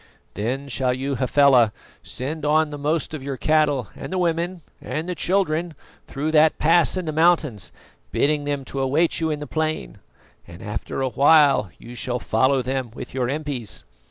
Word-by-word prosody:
"Then 125 +7 -3
shall 130 -1 0
you, 135 +2 -3
Hafela, 130 -3 +4 0.3
send 150 +4 -5
on 155 +1 +3
the 145 -1 -7
most 155 +2 -1
of 150 -4 -6
your 135 -1 -4
cattle 150 -6 +1
and - - -8
the 190 - -1
women 170 0 -1 0.2
and 155 +3 -4
the 180 - -2
children 175 -3 0 0.3
through 150 +3 -3
that 155 0 +4
pass 170 +3 +3
in 185 - -3
the 155 - -2
mountains, 155 - +2 0.4
bidding 145 0 +1
them 145 -2 -2
to 135 - -5
await 150 +6 +1
you 160 -1 0
in 150 -1 -2
the 150 - -5
plain, 155 - -3 0.5
and 85 +1 -11
after 105 +5 -4
a 130 - 0
while 140 - +4
you 120 - -11
shall 125 +1 -2
follow 130 +4 +1
them 130 -1 -2
with - - -8
your 125 -2 -1
impis. 140 -6 -4
145 Hz, 180 wpm, -23 LUFS, 130-155 Hz, 0.5 s, Hafela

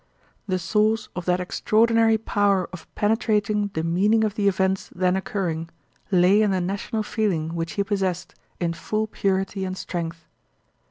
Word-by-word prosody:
The 185 -2 0
source 215 +4 +1
of 180 - -4
that 180 0 +2
extraordinary 225 +4 +3
power 200 -4 +1
of 185 - -9
penetrating 210 -1 +1
the 160 - -1
meaning 200 +7 +2
of 215 -2 0
the 205 -1 0
events 190 0 +1
then 180 0 +2
occuring 175 -4 -2 0.4
lay 190 +2 +5
in 210 - +3
the 190 -1 +1
national 200 +4 -2
feeling 180 -8 -1
which 165 -1 -3
he 200 - 0
possessed 190 -3 -2 0.3
in 170 -1 0
full 215 +6 -2
purity 195 -2 -1
and 185 0 -4
strength. 165 -2 -5
195 Hz, 155 wpm, -24 LUFS, 180-215 Hz, 0.4 s, lay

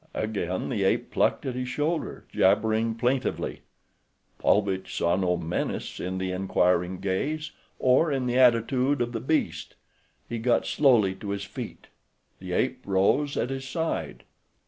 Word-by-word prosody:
Again 95 -4 -2
the 110 -7 -1
ape 95 - +1
plucked - - +1
at 130 - -2
his 125 0 -3
shoulder, 155 +4 -2
jabbering 110 +3 +2
plaintively. 125 +3 -1 0.8
Paulvitch 100 -2 +1
saw 85 +1 +2
no 90 -2 +1
menace 85 0 -3
in 95 +1 -3
the 95 0 -2
inquiring 90 -1 +1
gaze, 145 +12 -2 0.3
or 130 +5 +3
in 135 -2 0
the 125 +1 +1
attitude 125 +3 +3
of 120 0 -1
the 115 - -3
beast. 155 +7 -1 0.5
He 115 0 -4
got 120 +2 +2
slowly 120 -10 +4
to 100 +2 -8
his 100 0 -2
feet. 100 - -8 0.5
The 95 -1 -7
ape 130 +5 0
rose 100 +10 +2
at 125 - -1
his 135 0 -4
side. 160 +3 -3
115 Hz, 145 wpm, -26 LUFS, 95-130 Hz, 0.8 s, slowly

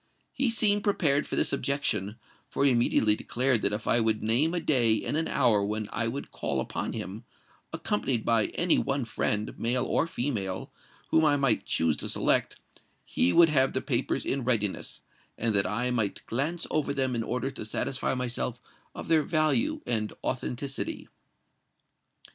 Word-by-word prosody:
He 265 -2 +1
seemed 205 -3 +3
prepared 150 -8 +1
for - - -3
this - - +1
objection; 140 -7 -1 0.3
for 140 - 0
he 140 - +5
immediately 115 -3 +3
declared 125 +1 0
that 100 - +1
if 105 +2 -4
I 120 - +3
would 110 -1 +1
name 130 +10 +2
a - - 0
day 125 -9 +3
and - - -1
an 160 +1 0
hour 105 -3 +2
when 105 +1 -2
I 115 - -1
would 135 +5 -5
call - - -2
upon - - -3
him, 105 +5 -6 0.5
accompanied 110 +2 -1
by 115 -2 +2
any 175 -1 +3
one 135 -2 -1
friend, 105 -1 -1
male 125 +2 +1
or 165 - +1
female, 110 - -3 0.4
whom 160 - +4
I 145 -2 +4
might 135 -5 +1
choose 80 -2 +1
to - - -3
select, - - +1 0.5
he 90 - +1
would 170 - +6
have 135 -3 +2
the 130 - -1
papers 125 -1 -1
in 135 -1 -1
readiness, 110 -5 -1 0.4
and 115 -1 +1
that 100 -2 +2
I 120 +4 -1
might 110 -5 -2
glance 155 +8 -1
over 145 -2 0
them 130 -2 0
in 115 - -1
order 125 +4 -2
to 135 - -7
satisfy 130 +5 -2
myself 125 -1 -3 0.4
of - - -7
their 160 -1 +4
value 155 -6 +1
and 110 -3 -1
authenticity." 130 +2 -4
125 Hz, 170 wpm, -28 LUFS, 110-140 Hz, 0.5 s, would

